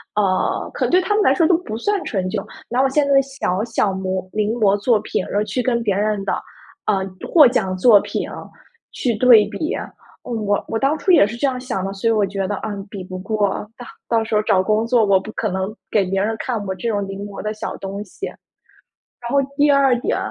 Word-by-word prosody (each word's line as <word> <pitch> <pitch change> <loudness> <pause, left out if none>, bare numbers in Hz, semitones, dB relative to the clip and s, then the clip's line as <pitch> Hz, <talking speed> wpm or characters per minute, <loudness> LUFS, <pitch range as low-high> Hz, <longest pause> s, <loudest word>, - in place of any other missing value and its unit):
呃， 195 -3 0
可 - - -1
能 - - -2
对 365 +1 +5
他 415 - -1
们 425 - +3
来 410 - +4
说 335 - +3
都 330 +1 +4
不 330 -11 -6
算 410 - 0
成 190 -5 -2
就， 205 0 -2 0.3
拿 245 +2 +1
我 270 - +4
现 290 +2 +2
在 280 - +2
的 275 - +6
小 265 -9 -2
小 225 -3 0
摹 190 0 -3
临 215 +1 0
摹 205 -4 +2
作 220 +3 +2
品， 200 - -2
而 205 +1 -1
去 250 +4 -2
跟 235 -1 0
别 205 -3 +1
人 205 0 0
的， - - -1 0.5
呃， 195 -3 +1 0.2
获 310 -4 +7
奖 190 -6 0
作 210 +2 +6
品， - - -4 0.6
去 245 - -1
对 230 -1 +7
比。 210 +10 -3 0.5
我 215 -4 -1
我 - - -2
当 275 +6 +1
初 370 - +1
也 335 - +7
是 210 +3 -5
这 280 - +1
样 255 -2 -2
想 245 -7 -3
的， 195 - -3
所 200 +3 -2
以 - - +4
我 215 -2 +2
觉 195 0 -3
得： 205 - -2
“嗯， 205 -2 -5
比 200 -2 -7
不 185 0 -7
过。 205 +1 -1
到 245 - -9 0.2
到 230 -1 +2
时 220 -1 -2
候 210 - +4
找 190 -3 +3
工 215 +3 +1
作， 235 -1 +3
我 200 -2 +4
不 215 +3 -9
可 215 - -2
能 190 +3 -3
给 205 -3 +2
别 190 +1 -1
人 220 +2 0
看 235 -5 -3
我 190 - -2
这 190 +6 -5
种 205 -3 -1
临 195 +1 -6
摹 200 -1 -7
的 215 - -3
小 215 - -5
东 195 +1 -6
西。” 215 - -7 0.9
然 240 - -6
后 280 - +3 0.2
第 290 0 +4
二 270 -3 +4
点 - - -1
215 Hz, 255 characters per minute, -20 LUFS, 195-250 Hz, 0.9 s, 获